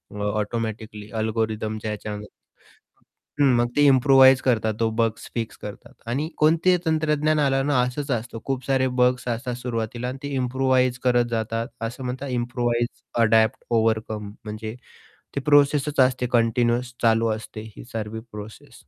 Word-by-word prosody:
अ, -, -, -6 dB
automatically 110 Hz, 0 st, -4 dB
अल्गोरिथमच्या 110 Hz, -1 st, -2 dB
ह्याच्यामध्ये. 105 Hz, 0 st, -6 dB, 1.1 s
हं. -, -, +6 dB
मग 120 Hz, 0 st, +2 dB
ते 145 Hz, -, +4 dB
इम्प्रुव्हाईज 135 Hz, -1 st, +6 dB
करतात 110 Hz, -4 st, +1 dB
तो 115 Hz, -, +3 dB
बग्स 115 Hz, -1 st, 0 dB
फिक्स 115 Hz, -2 st, -3 dB
करतात 105 Hz, +3 st, -9 dB, 0.2 s
आणि 145 Hz, +6 st, -1 dB
कोणतेही 165 Hz, +4 st, +4 dB
तंत्रज्ञान 155 Hz, -1 st, +1 dB
आलं 135 Hz, -2 st, +2 dB
ना, 145 Hz, -4 st, +3 dB
असंच 130 Hz, +4 st, -3 dB
असतं. 120 Hz, -1 st, -3 dB
खूप 130 Hz, -2 st, -3 dB
सारे 130 Hz, -1 st, +2 dB
बग्स 125 Hz, 0 st, +2 dB
असतात 120 Hz, +1 st, -2 dB
सुरुवातीला 120 Hz, 0 st, -3 dB
आणि 130 Hz, +1 st, -5 dB
ते 145 Hz, -, -4 dB
इम्प्रुव्हाईज 130 Hz, 0 st, +1 dB
करत 120 Hz, -1 st, +4 dB
जातात 115 Hz, +1 st, -2 dB, 0.2 s
असं 125 Hz, +3 st, -7 dB
म्हणतात 130 Hz, +3 st, -4 dB
इम्प्रुव्हाईज, 120 Hz, -1 st, 0 dB, 0.4 s
अडॉप्ट, 110 Hz, 0 st, +4 dB
ओव्हरकम 110 Hz, -2 st, 0 dB
म्हणजे 110 Hz, +1 st, -6 dB, 0.6 s
ती 140 Hz, -, +1 dB
प्रोसेसच 145 Hz, 0 st, +3 dB
असते 130 Hz, -1 st, +3 dB
कंटिन्युअस 120 Hz, +1 st, +1 dB
चालू 115 Hz, 0 st, +3 dB
असते, 110 Hz, 0 st, -5 dB
ही -, -, -10 dB
सर्वी 110 Hz, 0 st, -4 dB
प्रोसेस. 105 Hz, +1 st, -10 dB
120 Hz, 145 wpm, -24 LUFS, 110-130 Hz, 1.1 s, हं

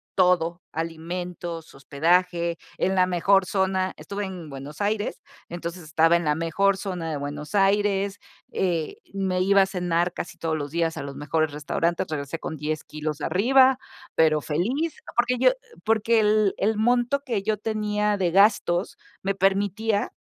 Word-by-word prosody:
todo, 175 Hz, -2 st, +2 dB
alimentos, 165 Hz, +1 st, -5 dB
hospedaje, 170 Hz, +5 st, +1 dB, 0.2 s
en 190 Hz, -, +1 dB
la 185 Hz, -, +5 dB
mejor 185 Hz, +2 st, +3 dB
zona. 190 Hz, -1 st, 0 dB
Estuve 200 Hz, 0 st, -5 dB
en 180 Hz, -5 st, -7 dB
Buenos 140 Hz, +5 st, -8 dB
Aires, 205 Hz, +1 st, -1 dB, 0.3 s
entonces 170 Hz, +1 st, -6 dB
estaba, 160 Hz, +2 st, +3 dB
en 170 Hz, -, -4 dB
la 150 Hz, -1 st, +2 dB
mejor 165 Hz, +5 st, +1 dB
zona 180 Hz, -5 st, -4 dB
de 150 Hz, -, -2 dB
Buenos 145 Hz, +5 st, -6 dB
Aires, 200 Hz, 0 st, +2 dB, 0.3 s
eh, 170 Hz, -4 st, -1 dB, 0.2 s
me 190 Hz, -2 st, -1 dB
iba 195 Hz, +1 st, +5 dB
a 190 Hz, -, +5 dB
cenar 175 Hz, -2 st, 0 dB
casi -, -, -6 dB
todos 160 Hz, -1 st, -1 dB
los 145 Hz, -2 st, -5 dB
días, 165 Hz, 0 st, 0 dB
a -, -, -4 dB
los 140 Hz, -1 st, -7 dB
mejores 155 Hz, +1 st, 0 dB
restaurantes, 165 Hz, +3 st, -1 dB
regresé 145 Hz, +1 st, -4 dB
con 160 Hz, -, -5 dB
10 155 Hz, +1 st, -3 dB
kilos 155 Hz, 0 st, -5 dB
arriba, 260 Hz, -, +4 dB, 0.4 s
pero 155 Hz, -1 st, +4 dB
feliz, 245 Hz, -, -1 dB, 0.2 s
porque 245 Hz, +1 st, +2 dB
yo -, -, +6 dB, 0.3 s
porque 225 Hz, +1 st, +3 dB
el 210 Hz, -1 st, +3 dB
el 215 Hz, +3 st, +1 dB
monto, 245 Hz, +5 st, +2 dB
que 230 Hz, -7 st, -1 dB
yo 215 Hz, +1 st, +1 dB
tenía 210 Hz, -1 st, 0 dB
de 180 Hz, -3 st, +1 dB
gastos, 195 Hz, -2 st, +3 dB, 0.3 s
me 195 Hz, 0 st, 0 dB
permitía 200 Hz, +2 st, +1 dB
180 Hz, 155 wpm, -25 LUFS, 165-205 Hz, 0.4 s, yo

